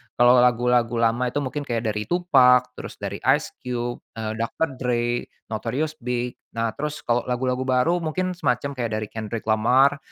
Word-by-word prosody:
Kalau 120 +1 +6
lagu-lagu 120 -1 +3
lama 115 +2 +2
itu 140 +4 -2
mungkin 145 +2 -4
kayak 115 -2 -1
dari 105 0 -4
Tupac, 130 -8 +4
terus - - -8
dari - - -5 0.2
Ice - - -5
Cube, 120 -1 -3 0.2
eee 110 -1 -3
Dr. 115 +7 -1
Dre, 120 -1 0 0.3
Notorious 130 +8 -2
B.I.G. 125 0 -2 0.2
Nah, 115 0 0
terus 150 0 -4
kalo 120 -2 0
lagu-lagu 125 +1 -1
baru 130 +6 +2
mungkin 185 +3 -1
semacam 140 -2 0
kayak 120 -2 -2
dari 110 0 -2
Kendrick 110 0 -5
Lamar, 130 +6 +4
125 Hz, 165 wpm, -24 LUFS, 120-135 Hz, 0.3 s, Kalau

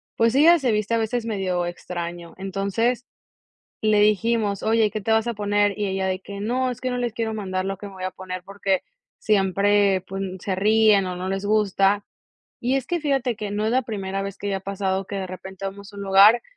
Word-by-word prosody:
pues, 230 +2 +2
ella 335 +4 +7
se 255 -6 0
viste 215 +1 0
a - - +3
veces 230 +1 -1
medio 185 -5 -1
extraño. 175 -1 -6
Entonces 200 +6 -1 0.8
le 215 -1 +3
dijimos: 210 -1 +2
"Oye, 220 -1 +3
¿qué 215 - -4
te 220 +2 0
vas 220 +1 +3
a 235 - -1
poner?" 205 0 +1
Y 205 - 0
ella 190 0 -1
de 185 0 -1
que: 200 +1 -8
"No, 250 +4 0
es 245 - -7
que 255 - -1
no 250 - -2
les 240 -2 -1
quiero 225 -1 -2
mandar 185 -3 -3
lo 195 0 -3
que 205 - -8
me 200 - -9
voy 185 -1 -7
a 185 - -1
poner, 185 0 -7
porque 195 -1 -1 0.4
siempre 200 -1 +3
pun 190 -1 -4
se 190 -2 -2
ríen, 210 -1 +4
o 180 - -3
no 185 +1 -4
les 195 +1 -2
gusta". 205 -1 +2 0.6
Y 250 +3 +1
es 260 - -5
que 345 -2 -1
fíjate 270 -5 0
que 210 -1 -5
no 210 +1 -1
es 220 - +1
la 260 +1 +3
primera 195 -3 -3
vez 195 -1 -5
que 205 - -5
ya 195 -1 0
ha - - -7
pasado 195 -1 -2
que 200 - -6
de 190 -1 -3
repente 190 +1 -8
vamos 200 +1 -7
a 200 - -12
un 200 - -5
lugar, 200 +4 +6
200 Hz, 230 wpm, -23 LUFS, 190-220 Hz, 0.8 s, ella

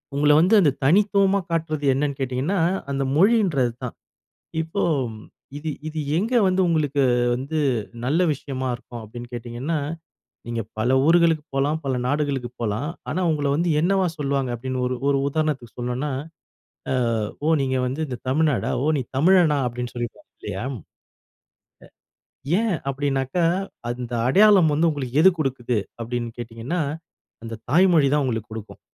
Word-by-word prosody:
உங்கள 150 +1 +4
வந்து 180 +7 +3
அந்த 150 -6 +4
தனித்துவமா 200 +4 +4
காட்டுறது 155 -3 -1
என்னன்னு 140 0 -1
கேட்டிங்கன்னா, 135 +8 -1 0.3
அந்த 135 0 0
மொழின்றது 180 - +3
தான். 125 - -5 0.7
இப்போ 165 +5 -3 0.8
இது 160 +1 -4 0.2
இது 155 0 -6 0.2
எங்க 225 +8 0
வந்து 185 0 +2
உங்களுக்கு 145 -4 +1 0.3
வந்து 140 +5 -3 0.5
நல்ல 150 +7 +1
விஷயமா 130 -2 -4
இருக்கும் 120 0 -9
அப்டின்னு 120 +3 -9
கேட்டிங்கன்னா? 120 +7 -3 0.7
நீங்க 115 -1 -2 0.2
பல 110 +3 0 0.2
ஊர்களுக்கு 165 -2 +4
போலாம். 145 +3 +1
பல 130 -2 0
நாடுகளுக்கு 140 -3 -1
போலாம். 115 +6 -1 0.2
ஆனா 185 - -1
உங்கள 145 -2 -1
வந்து 170 +2 0
என்னவா 190 +3 +2
சொல்வாங்க 140 -3 -1
அப்படின்னு 130 +2 -4
ஒரு 125 - -2
ஒரு 140 - +3
உதாரணத்துக்கு 145 -5 -2
சொல்ணுன்னா, 125 +4 -2 0.8
அ - - +2 0.5
"ஓ! - - +1
நீங்க 130 -1 0
வந்து 135 +5 -3
இந்த 125 -3 -5
தமிழ்நாடா? 150 0 +1
ஓ! - - 0
நீ 135 - -1
தமிழனா? 165 -1 +5
அப்டின்னு 125 0 -5
சொல்லிப்பாங்க, 120 -1 -6
இல்லையா? 95 +3 -5
அ. - - -5 1.9
ஏன் 225 -2 0 0.2
அப்படின்னாக்கா, 135 +4 -1 0.5
அந்த 120 0 -4
அடையாளம் 190 0 +6
வந்து 165 +3 +3
உங்களுக்கு 140 -2 -2
எது 190 - +9
கொடுக்குது? 125 -4 -1 0.2
அப்படின்னு 120 0 -3
கேட்டீங்கன்னா, 120 +9 -4 0.6
அந்த 115 0 -5 0.2
தாய்மொழி 165 -3 +5
தான் 150 -2 +2
உங்களுக்கு 110 -3 -3
கொடுக்கும். 110 -1 -8
140 Hz, 140 wpm, -23 LUFS, 125-165 Hz, 1.9 s, எது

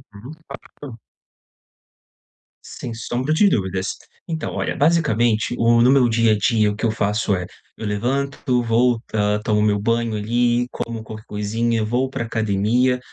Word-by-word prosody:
Aham. 125 +9 -10 0.5
Claro. 130 -6 -9 1.7
Sem 120 - -7
sombra 120 +6 -2
de 200 +6 +4
dúvidas. 95 - -2 0.3
Então, 160 -2 -4
olha, - - -2
basicamente, 120 -8 +2
o 115 0 +4
no 125 - +5
meu 135 -3 +4
dia 115 -1 +2
a 105 - +3
dia, 110 -1 +2
o - - -5
que 115 - -2
eu 115 - +2
faço 105 -1 0
é: 90 -1 -3 0.3
eu 110 - -6
levanto, 125 +4 -1
volta, 115 -3 +1
tomo 105 -1 +1
meu 105 -1 +2
banho, 115 +1 0
ali, 120 +3 +1
como 115 -1 -5
qualquer 110 0 -10
coisinha, 110 +2 -1
vou 125 +4 0
pra 125 - -4
academia. 115 +3 +1
115 Hz, 150 wpm, -21 LUFS, 105-125 Hz, 1.7 s, no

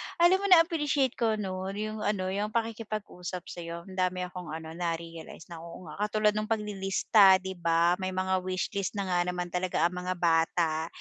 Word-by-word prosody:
alam 345 +3 +5
mo 400 - -1
na 355 -3 +8
appreciate 295 -6 0
ko 225 -2 +2
no 190 -2 -4
'yong 215 +1 -4
ano 190 -3 -1
yung 210 +3 -3
pakikipag-usap 215 -6 -4
sa 175 - -8
'yo 170 0 -6
ang 190 +1 -12
dami 185 0 0
akong 180 -1 -7
ano 160 +1 -6
na-realize 165 -1 -5
na 165 - -7
oo 170 0 -10
nga 175 - -11
katulad 215 0 +2
ng 215 0 -2
paglilista 200 -2 +4
'di 190 - -4
ba 170 +2 +3
may 185 0 -3
mga 185 0 +1
wishlist 185 +2 -3
na 195 -2 -2
nga 175 - +2
naman 180 -1 -3
talaga 180 +1 0
ang 170 - +3
mga 180 +1 -2
bata 165 -1 +1
185 Hz, 190 wpm, -29 LUFS, 175-210 Hz, -, na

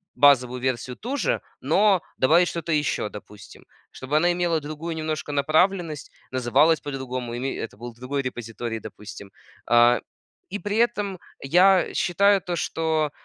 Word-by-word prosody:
базовую 125 -2 +4
версию 125 -1 -2
ту 260 +6 -4
же, - - 0 0.2
но 205 -3 +3 0.2
добавить 165 +7 +4
что-то 170 -1 -4
ещё, 150 -7 0
допустим. 105 -1 -13 0.3
Чтобы 135 +3 -2
она 175 +3 +3
имела 175 -2 0
другую 155 +3 -6
немножко 155 -1 -3
направленность, 155 +2 +1 0.2
называлась 135 +6 +3
по-другому, 130 -4 -5
и 120 - -4
ме 135 +2 -3
это 115 - -6
был 120 +2 -8
другой 130 +4 -3
репозиторий, 115 -2 -5
допустим. 105 -2 -10 0.3
А, 120 +1 +5 0.5
и 205 - -3
при 205 +3 -3
этом 205 -5 0 0.2
я 180 +6 +4
считаю 200 +3 +3
то, 175 0 -3
что, 160 -2 -1
150 Hz, 145 wpm, -24 LUFS, 125-175 Hz, 0.5 s, А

